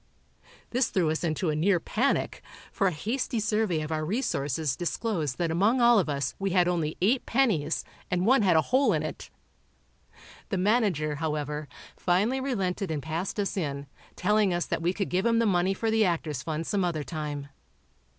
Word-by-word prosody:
This 250 0 +2
threw 170 -5 +1
us 160 - -2
into 160 0 0
a - - -1
near 175 +4 +3
panic, 250 +11 0 0.3
for 195 - +1
a - - +2
hasty 225 - -2
survey 215 -6 0
of 155 +1 -5
our 155 0 -1
resources 155 - -1
disclosed 175 - -2
that 170 -2 0
among 205 +10 +2
all 235 -2 +6
of 170 - -1
us 140 -2 -1
we 195 0 0
had 180 -1 +3
only 165 -3 -1
eight 240 +6 +2
pennies 205 - +1 0.2
and 180 0 0
one 255 +2 +5
had 185 -5 +4
a 160 - +5
hole 260 +2 +3
in - - 0
it. - - -6 1.2
The 195 - -1
manager, 185 - +1
however, 150 -1 -3 0.3
finally 205 +9 +1
relented 195 -8 -2
and 150 -3 -3
passed 170 +7 -3
us 200 - -1
in, 140 -6 -3 0.3
telling 210 +1 +2
us 175 - -1
that - - -2
we 170 +2 +1
could 195 +1 -3
give 185 +2 0
him 230 0 +3
the 230 - +3
money 190 -1 +2
for 225 +3 -1
the 220 0 +3
Actors' 160 -7 -1
Fund 160 +3 -3
some 200 0 0
other 165 -4 -1
time. 145 -3 -5
180 Hz, 190 wpm, -27 LUFS, 155-215 Hz, 1.2 s, all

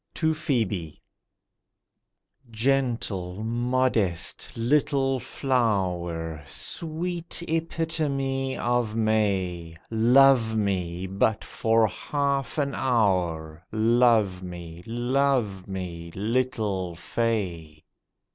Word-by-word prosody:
TO 160 -1 +2
PHŒBE 110 - -2 1.5
"GENTLE, 115 -6 -1
modest 120 -6 0
little 135 +1 +2
flower, 90 - -1
Sweet 170 +1 -2
epitome 150 -5 -1
of 120 -2 0
May, 95 -7 0 0.2
Love 120 0 +5
me 95 -4 -1
but 100 +3 0
for 115 0 +2
half 140 +5 -1
an 140 -2 0
hour, 90 -10 0
Love 110 -4 +3
me, 85 -2 -8
love 120 -4 0
me, 90 -3 -5
little 105 -5 -1
fay." 90 -7 -2
110 Hz, 75 wpm, -26 LUFS, 90-135 Hz, 1.5 s, Love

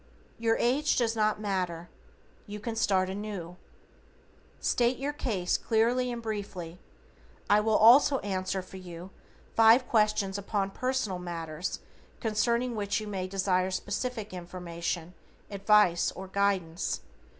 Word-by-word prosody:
Your 225 0 +2
age 270 +6 +2
does 230 -2 +1
not 215 -1 +1
matter, 180 -5 -2 0.6
you 210 +1 -6
can 225 +2 -4
start 190 -4 +2
anew. 190 -3 -6 1.0
STATE 245 +1 +1
YOUR 285 +2 -3
CASE 205 -11 -1
CLEARLY 240 +3 +1
AND 235 -1 -5
BRIEFLY. 190 -6 -5 0.7
I 205 - +5
will 215 0 +2
also 265 +5 +7
answer 190 -1 -2
for 190 - -11
you 180 0 -9 0.4
five 225 +3 +6
questions 210 -3 +1
upon 200 -1 -2
personal 255 -6 -1
matters 165 -1 -5 0.4
concerning 235 +2 0
which 205 -1 -1
you 215 - -6
may 190 -3 -3
desire 185 -1 +1
special 205 +6 -2 0.2
information, 175 -1 -5 0.4
advice, 200 -3 +3
or 190 +1 -8
guidance. 190 -3 0
200 Hz, 125 wpm, -29 LUFS, 185-225 Hz, 1.0 s, also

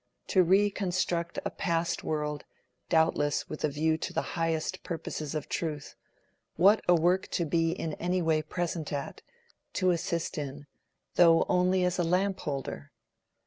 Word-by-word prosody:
To 185 - +5
reconstruct 185 -2 +1
a - - -1
past 170 0 -1
world, 150 -1 -2 0.5
doubtless 160 -2 +2
with 155 - -7
a 155 - +3
view 160 +2 0
to - - -4
the - - -1
highest 165 +2 -1
purposes 155 -2 -5
of 150 - -3
truth—what 165 +5 -1
a 175 - +6
work 175 +3 +2
to 170 - -1
be 165 +1 +1
in 165 -3 -4
any 180 +3 -1
way 160 -2 +2
present 165 0 -3
at, 140 -2 -4 0.5
to 185 -1 +2
assist 170 -2 -2
in, 145 0 -6 0.5
though 165 -2 +6
only 185 0 +2
as 180 0 0
a - - +3
lamp 185 +3 +1
holder! 135 - -5
165 Hz, 145 wpm, -29 LUFS, 155-180 Hz, 0.5 s, a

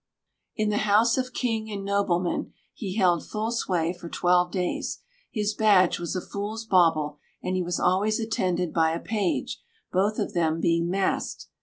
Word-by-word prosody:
In 215 -1 0
the 210 - +1
house 220 +3 +5
of 255 0 -2
king 225 -4 -2
and 200 -2 -5
nobleman 190 -3 0 0.2
he 195 -5 -5
held 180 -6 +3
full 220 +1 -3
sway 175 -7 0
for 175 -1 -10
twelve 180 +1 +2
days. 180 -1 -2 0.3
His 210 -2 -1
badge 205 -5 +4
was 170 +2 -3
a 185 - -1
fool's 210 +4 -5
bauble 160 -7 +3 0.2
and 185 - -1
he 185 - +1
was 175 0 -2
always 205 +5 +2
attended 180 -6 -1
by 160 -1 +3
a 165 - -2
page, 210 -5 -2 0.3
both 200 +3 +1
of - - -2
them 165 -2 +1
being 170 0 +1
masked. 190 +1 -1
185 Hz, 170 wpm, -26 LUFS, 175-215 Hz, 0.3 s, house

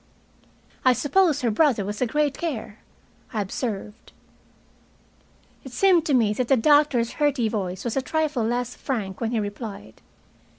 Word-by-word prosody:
"I 255 - +5
suppose 290 - +2
her 240 -3 +1
brother 235 -4 +2
was 205 +3 -5
a 250 - +2
great 295 +2 0
care," 230 -10 -5 0.5
I 220 - -1
observed. 210 +1 -5 1.5
It 265 - -10
seemed 355 0 +3
to 285 - +3
me 220 -4 +3
that 250 +2 -2
the 270 - +4
doctor's 290 -3 +3
hearty 280 -6 +2
voice 190 -4 -3
was 235 - -3
a 270 - +1
trifle 305 -4 -1
less 245 +2 -1
frank 210 -8 -4
when 230 - 0
he 235 -1 0
replied. 205 - -7
245 Hz, 155 wpm, -24 LUFS, 215-290 Hz, 1.5 s, I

